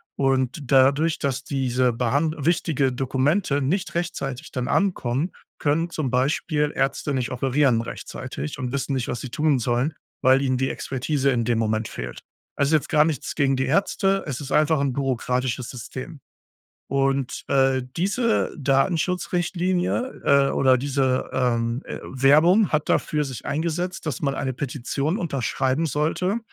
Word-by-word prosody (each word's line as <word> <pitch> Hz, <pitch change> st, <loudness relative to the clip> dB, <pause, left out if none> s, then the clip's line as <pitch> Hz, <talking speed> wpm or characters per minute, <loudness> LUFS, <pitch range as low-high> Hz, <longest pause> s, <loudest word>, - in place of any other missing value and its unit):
Und 135 Hz, +1 st, +1 dB
dadurch, 140 Hz, +4 st, +4 dB
dass 135 Hz, -3 st, -2 dB
diese 130 Hz, -2 st, +1 dB
Behand 140 Hz, +7 st, 0 dB
wichtige 150 Hz, -3 st, +1 dB
Dokumente 140 Hz, +4 st, +1 dB
nicht 180 Hz, +7 st, -1 dB
rechtzeitig 150 Hz, -5 st, -3 dB
dann 125 Hz, -2 st, -3 dB
ankommen, 165 Hz, -5 st, 0 dB, 0.3 s
können 160 Hz, +4 st, +1 dB
zum 155 Hz, -6 st, -2 dB
Beispiel 150 Hz, +3 st, +1 dB
Ärzte 135 Hz, +1 st, 0 dB
nicht 130 Hz, -2 st, -1 dB
operieren 130 Hz, -1 st, +2 dB
rechtzeitig 75 Hz, -9 st, -6 dB
und 125 Hz, -1 st, -3 dB
wissen 140 Hz, 0 st, -2 dB
nicht, 130 Hz, -3 st, -1 dB
was 120 Hz, -, -3 dB
sie 130 Hz, -, -6 dB
tun 150 Hz, -1 st, +1 dB
sollen, 120 Hz, +6 st, 0 dB, 0.3 s
weil 130 Hz, +1 st, +5 dB
ihnen 130 Hz, -2 st, +1 dB
die 130 Hz, +1 st, 0 dB
Expertise 135 Hz, +1 st, -1 dB
in 120 Hz, -2 st, 0 dB
dem 120 Hz, -2 st, +1 dB
Moment 110 Hz, 0 st, 0 dB
fehlt. 60 Hz, 0 st, -7 dB, 0.3 s
Es 140 Hz, -, +1 dB
ist 160 Hz, -, 0 dB
jetzt 155 Hz, -, +2 dB
gar 150 Hz, -1 st, +5 dB
nichts 155 Hz, -5 st, -2 dB
gegen 135 Hz, -2 st, +2 dB
die 130 Hz, 0 st, 0 dB
Ärzte. 195 Hz, +5 st, +1 dB
Es 135 Hz, -4 st, -3 dB
ist 140 Hz, -1 st, -7 dB
einfach 155 Hz, -1 st, +3 dB
'n 135 Hz, -3 st, 0 dB
bürokratisches 125 Hz, -2 st, -1 dB
System. 130 Hz, +5 st, -8 dB, 0.7 s
Und, 135 Hz, -1 st, 0 dB
äh, 135 Hz, -1 st, +2 dB
diese 215 Hz, +6 st, +1 dB
Datenschutzrichtlinie, 175 Hz, -, 0 dB
äh 140 Hz, -1 st, +4 dB
oder 130 Hz, -1 st, +4 dB
diese, 130 Hz, -1 st, 0 dB
ähm, 120 Hz, -1 st, 0 dB
äh, -, -, -6 dB
Werbung 155 Hz, +10 st, +4 dB
hat 150 Hz, -1 st, 0 dB
dafür 150 Hz, -1 st, +1 dB
sich 130 Hz, -5 st, -7 dB
eingesetzt, 170 Hz, +4 st, -2 dB
dass 140 Hz, -5 st, -3 dB
man 140 Hz, -2 st, 0 dB
eine 130 Hz, -1 st, -2 dB
Petition 140 Hz, -, -2 dB
unterschreiben 135 Hz, -, -1 dB
sollte, 160 Hz, -, 0 dB
140 Hz, 150 wpm, -24 LUFS, 130-155 Hz, 0.7 s, weil